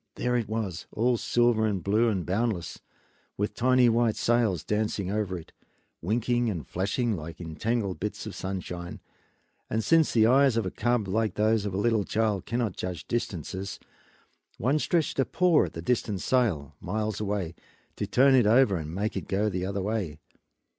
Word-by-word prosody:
There 125 0 0
it 115 -4 -1
was, 105 -6 -3
all 120 +3 +2
silver 120 -2 +2
and 100 -5 -2
blue 110 +5 +3
and 95 -5 -1
boundless, 100 -2 -2 0.6
with 105 +1 -1
tiny 130 0 +4
white 115 -1 +2
sails 115 -8 +1
dancing 105 -3 -1
over 100 -3 -1
it, 80 - -12 0.5
winking 120 +5 +1
and 85 -9 -4
flashing 105 +5 -1
like 80 -1 -8
entangled 95 +5 -2
bits 105 +2 -4
of - - -6
sunshine; 90 -2 -5 0.7
and 110 0 0
since 165 +3 +4
the 110 -2 +4
eyes 130 0 +4
of 115 - +1
a 95 - -3
cub, 120 -4 0
like 110 +3 0
those 110 -1 +2
of 100 - -4
a - - -1
little 110 0 +2
child, 105 -2 -1
cannot 115 -4 -1
judge 90 -3 -5
distances, 95 -3 -3 0.8
one 135 +8 +1
stretched 160 -3 0
a - - +5
paw 180 - +3
at 80 - -8
the 85 - -7
nearest 125 +5 +1 0.2
sail, 105 - +1
miles 110 +3 -2
away, 100 -5 -2 0.4
to - - -3
turn 135 +2 +5
it 125 -5 +5
over 110 -4 +4
and 80 +1 -6
make 105 +3 -2
it 95 - -4
go 105 +2 +1
the 90 -1 -2
other 100 -1 -2
way. 100 -8 -2
105 Hz, 175 wpm, -27 LUFS, 95-120 Hz, 0.8 s, a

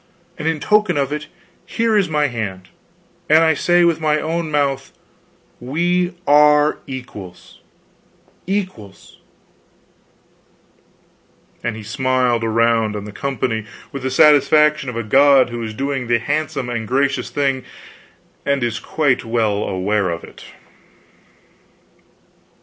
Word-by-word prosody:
And 155 - -3
in 160 -1 0
token 210 -2 +2
of 140 -1 0
it, 150 0 -5 0.4
here 230 -1 0
is 200 -5 +2
my 150 -1 +1
hand; 100 -8 -5 0.6
and 160 +2 +6
I 160 -1 +4
say 175 +3 +3
with 165 -1 +1
my 155 -1 +1
own 165 +1 -2
mouth 140 -2 -1 0.7
we 175 +7 -1
are 150 +1 +4
equals 105 -9 -10 0.9
equals" 185 - -5 2.4
and 120 -2 -2
he 110 - -9
smiled 125 0 0
around 115 -1 +1
on 105 -1 -5
the 105 - -8
company 115 -3 -3 0.2
with 140 - -6
the 130 - -2
satisfaction 150 +1 +4
of 125 - -6
a 115 - -2
god 135 +2 +4
who 120 0 -5
is 110 -1 -4
doing 135 -1 -3
the 120 0 +3
handsome 145 +1 -2
and 115 -2 -4
gracious 140 +3 0
thing 135 -2 -1 0.8
and 140 -2 0
is 115 -3 -2
quite 145 -5 0
well 110 -3 0
aware 95 +1 -1
of 85 0 -4
it. - - -13
135 Hz, 125 wpm, -19 LUFS, 115-150 Hz, 2.4 s, and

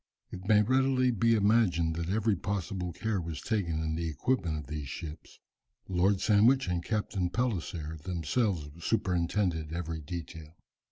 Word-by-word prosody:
It 95 +1 -8
may 105 -1 +6
readily 130 +1 +3
be 115 +1 +3
imagined 100 -7 +3
that 85 0 -3
every 110 +1 +2
possible 90 -1 -3
care 105 +2 -2
was 80 -3 -5
taken 85 - -1
in 80 0 -1
the 85 0 -2
equipment 80 - 0
of 75 - -6
these 75 -2 -5
ships. 80 +2 -8 0.5
Lord 95 +1 +2
Sandwich 115 +5 +4
and 90 -1 -1
Captain 100 -4 -1
Palliser 85 -9 -2
themselves 85 - -1
superintended 90 -5 0
every 80 -1 -4
detail. 80 0 -8
90 Hz, 145 wpm, -30 LUFS, 80-105 Hz, 0.5 s, may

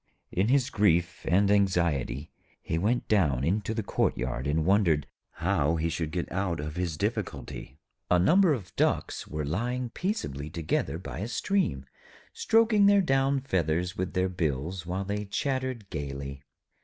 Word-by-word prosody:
In 95 +4 +1
his 130 0 +2
grief 85 -4 +2
and 100 +4 +4
anxiety 85 -10 +1 0.3
he 80 - -2
went 115 +7 0
down 75 - +2
into 100 +6 0
the 110 - -1
courtyard 65 -7 -1
and 75 +2 +1
wondered 90 -7 +3 0.3
how 75 +4 +1
he 80 +1 0
should 80 -1 -2
get 85 +2 -3
out 90 -3 -1
of 75 +1 -5
his 90 -4 -2
difficulty. 65 - -4 0.3
A 90 - +5
number 175 - +5
of 100 -10 -3
Ducks - - 0
were 75 -1 -3
lying 120 - -2
peaceably 75 - -3
together 80 0 -1
by 95 - -7
a 105 - -3
stream, 150 - 0 0.5
stroking 220 -2 +4 0.2
down 135 -1 +2
their 135 - -21
feathers 90 - 0
with 95 0 -3
their 90 0 +1
bills, 85 0 -2
while 95 +2 -2
they 105 +1 -2
chattered 130 0 -2
gaily. 70 -3 -5
90 Hz, 155 wpm, -28 LUFS, 80-110 Hz, 0.5 s, A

